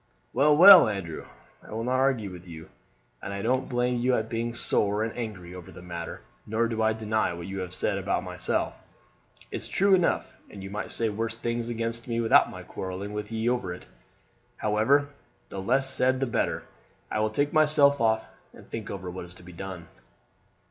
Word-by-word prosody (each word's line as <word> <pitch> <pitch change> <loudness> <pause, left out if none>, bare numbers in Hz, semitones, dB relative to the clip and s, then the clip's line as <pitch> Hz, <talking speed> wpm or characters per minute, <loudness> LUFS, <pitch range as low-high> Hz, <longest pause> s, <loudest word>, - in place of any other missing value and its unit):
"Well, 145 +3 +4
well, 185 - +10
Andrew, 95 -6 -5 0.3
I - - -16
will 115 +1 -3
not 130 +2 +1
argue 130 -7 +1
with 90 0 -11
you, 80 -1 -10 0.5
and 100 - -6
I 100 0 -4
don't 130 +3 0
blame 125 -1 0
you 125 +1 +2
at 110 -1 -2
being 115 +1 -3
sore 105 -2 +1
and 115 - -4
angry 100 -7 -6
over 90 -2 -10
the 90 - -12
matter; 85 -1 -6 0.3
nor 110 +2 +1
do 115 -1 -2
I 110 0 +3
deny 110 -4 -1
what 85 0 -7
you 95 0 -5
have 90 -1 -5
said 90 - -1
about - - -1
myself; - - -1 0.8
it's - - -4
true 195 +1 +3
enough, 180 -2 +1
and 100 -2 -10
you 95 - -7
might 105 +1 -4
say 115 -1 0
worse 110 +2 -3
things 120 0 -3
against 115 0 -3
me 115 -1 -1
without 115 -1 +5
my - - -9
quarreling 95 +2 -6
with 105 +1 -5
ye 110 +1 -2
over 120 -7 0
it. 75 - -14 0.7
However, 120 +7 +2 0.4
the 95 - -5
less 135 +6 +2
said 130 0 +2
the 135 - +1
better. 120 - -1 0.5
I - - 0
will 110 0 +1
take 145 +7 0
myself 150 -3 +5
off 110 -1 +2 0.3
and - - -15
think 110 -2 -6
over 95 -2 -5
what's 90 -1 -9
to - - -16
be 90 0 -12
done." 90 -1 -7
110 Hz, 195 wpm, -27 LUFS, 95-125 Hz, 0.8 s, well